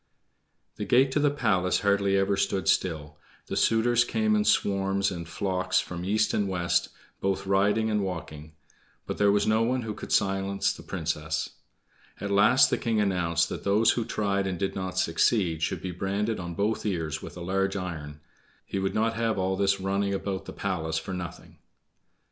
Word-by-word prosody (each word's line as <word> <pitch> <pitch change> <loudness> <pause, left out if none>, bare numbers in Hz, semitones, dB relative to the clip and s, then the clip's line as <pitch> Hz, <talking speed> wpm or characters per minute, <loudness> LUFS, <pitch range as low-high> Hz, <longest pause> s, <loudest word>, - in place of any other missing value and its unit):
The - - -3
gate 130 +2 +4
to 150 - +1
the 145 0 +3
palace 95 -10 +1
hardly 100 -1 +2
ever 95 +1 +2
stood 95 0 -1
still. 75 -4 0 0.3
The - - -5
suitors 120 +1 +3
came 215 - +1
in 210 0 +1
swarms 100 - +1
and 85 -2 -6
flocks 95 +1 0
from 90 -1 -5
east 110 +3 +1
and 100 -2 0
west, 90 -2 0 0.3
both 95 0 -1
riding 105 +3 +2
and 105 -1 +1
walking. 80 -4 -6 0.5
But - - -5
there 105 0 +4
was 100 0 +2
no 110 +1 +3
one 125 +2 0
who 110 -1 -4
could - - -9
silence 95 0 +1
the - - -11
Princess. 80 -2 -3 0.7
At 100 - -4
last 105 +7 +5
the - - +1
king 115 -2 0
announced 85 -4 +1
that - - -6
those 105 +3 +4
who 120 - -1
tried 100 -3 -1
and 95 -2 -2
did 95 +2 -2
not 95 -1 -4
succeed 85 -1 +2
should - - -2
be 95 - -3
branded 100 +5 -2
on 85 -1 -6
both 105 +4 0
ears 80 -6 -2
with - - -9
a - - -7
large 95 +2 0
iron; 75 -6 -6 0.4
he 95 - -3
would 95 0 -2
not 115 +1 +1
have 115 -1 -1
all 95 0 0
this 100 0 +1
running 100 +1 0
about 95 0 -4
the - - -7
palace 80 -5 -2
for 95 +4 -4
nothing. 90 -2 -8
95 Hz, 185 wpm, -27 LUFS, 90-105 Hz, 0.7 s, last